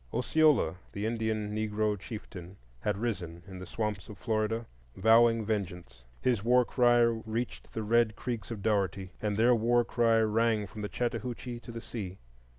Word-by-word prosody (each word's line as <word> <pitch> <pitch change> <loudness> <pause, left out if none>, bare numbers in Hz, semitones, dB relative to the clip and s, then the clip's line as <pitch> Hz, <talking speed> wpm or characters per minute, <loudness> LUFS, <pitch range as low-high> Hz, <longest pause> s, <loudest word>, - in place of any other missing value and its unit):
Osceola, 140 - +3 0.2
the 100 +1 -3
Indian 110 -2 -1
Negro 110 0 0
chieftain, 95 -3 -9 0.2
had 105 +7 -1
risen 90 -7 -4
in 95 -1 -9
the 95 - -8
swamps 105 -2 -3
of 105 - -9
Florida, 110 +1 -1 0.3
vowing 115 +2 +5
vengeance. 90 - -4 0.2
His 120 -6 +1
war 125 +1 +4
cry 120 -1 +4
reached 115 0 -1
the 110 - -3
red 115 0 +3
Creeks 115 -4 -4
of 105 -4 -6
Dougherty, 95 -3 0
and 105 -1 -1
their 120 +3 +5
war 120 +1 +3
cry 115 -1 +3
rang 110 0 +2
from 105 +2 -9
the 105 - -3
Chattahoochee 120 0 -3
to 120 - -10
the 115 0 -6
sea. 100 -6 -6
110 Hz, 160 wpm, -30 LUFS, 100-115 Hz, 0.3 s, vowing